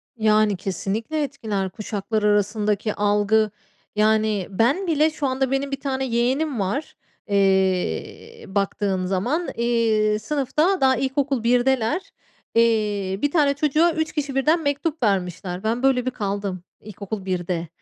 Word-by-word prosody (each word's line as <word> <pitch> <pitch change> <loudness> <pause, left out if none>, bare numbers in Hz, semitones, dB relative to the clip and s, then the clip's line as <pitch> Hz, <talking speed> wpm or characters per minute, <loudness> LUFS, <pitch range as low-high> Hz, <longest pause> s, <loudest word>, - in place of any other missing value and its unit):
Yani 215 -2 +3
kesinlikle 205 - -2
etkiler 220 -9 -3
kuşaklar 210 +1 -3
arasındaki 210 0 +1
algı. 210 +1 +2 0.4
Yani 215 -2 +2
ben 245 - +1
bile 310 -1 +3
şu 305 -2 -3
anda 265 0 -1
benim 275 +1 -1
1 275 - -3
tane 265 -1 -2
yeğenim 255 +3 0
var. 200 +10 -2 0.3
Eee, 195 - 0
baktığın 195 -1 -1
zaman, 240 - -1
iii, 225 -3 +1
sınıfta 300 - 0
daha 265 -1 +4
ilkokul 270 -1 -1
1'deler. 245 +5 +1 0.4
Eee, 210 -4 +1
1 290 - +1
tane 290 -4 +3
çocuğa 305 +4 +2
3 315 0 -2
kişi 285 -3 -3
birden 310 +5 +3
mektup 285 +1 -1
vermişler. 180 -2 -1
Ben 230 +3 -1
böyle 260 -2 +3
bir 255 - 0
kaldım 200 -5 -3 0.2
ilkokul 205 -1 -7
1'de, 175 -2 -2
225 Hz, 130 wpm, -23 LUFS, 200-275 Hz, 0.4 s, daha